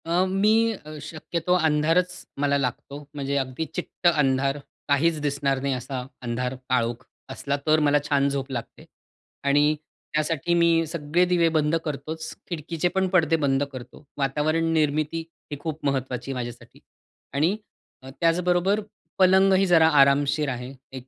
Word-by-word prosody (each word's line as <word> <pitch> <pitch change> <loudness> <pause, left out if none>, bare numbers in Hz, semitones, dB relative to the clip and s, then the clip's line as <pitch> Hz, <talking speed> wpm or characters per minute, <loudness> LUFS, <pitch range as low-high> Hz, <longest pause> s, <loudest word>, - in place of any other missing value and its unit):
अ, 175 +3 +2
मी 215 +4 +3
अ, 155 -6 -10
शक्यतो 170 +3 -3
अंधारच 165 +2 +2 0.3
मला 140 0 +2
लागतो. 140 +1 -3 0.2
म्हणजे 140 -1 -3
अगदी 135 +3 -2
चिट्ट 180 0 -2
अंधार. 135 -3 +2 0.3
काहीच 155 +3 +2
दिसणार 140 -2 0
नाही 140 0 0
असा 125 0 -4 0.2
अंधार, 125 +1 -2
काळोख 120 -2 0 0.3
असला 140 0 -2
तर 155 0 +5
मला 145 -1 +3
छान 140 -1 +3
झोप 140 0 -3
लागते 120 -3 -6 0.6
आणि 145 +2 +4 0.4
त्यासाठी 155 +2 0
मी 170 -1 +3
सगळे 165 +2 0
दिवे 175 -2 +3
बंद 155 0 +1
करतोच. 155 +2 -5 0.2
खिडकीचे 165 0 -2
पण 190 0 +2
पडदे 165 -4 +3
बंद 135 0 +2
करतो. 130 +2 -10
वातावरण 155 +4 0
निर्मिती 155 +1 0 0.3
ही 145 - -4
खूप 155 0 -5
महत्त्वाची 130 -2 -2
आहे - - -4
माझ्यासाठी 120 -1 -7 0.5
आणि 160 +9 +1 0.5
अ, 130 - -9
त्याचबरोबर 180 +4 +2 0.4
पलंगही 190 +1 +5
जरा 165 -3 +5
आरामशीर 140 +2 +3
आहे. 125 0 -5 0.2
एक 130 -1 -9
150 Hz, 140 wpm, -25 LUFS, 140-170 Hz, 0.6 s, तर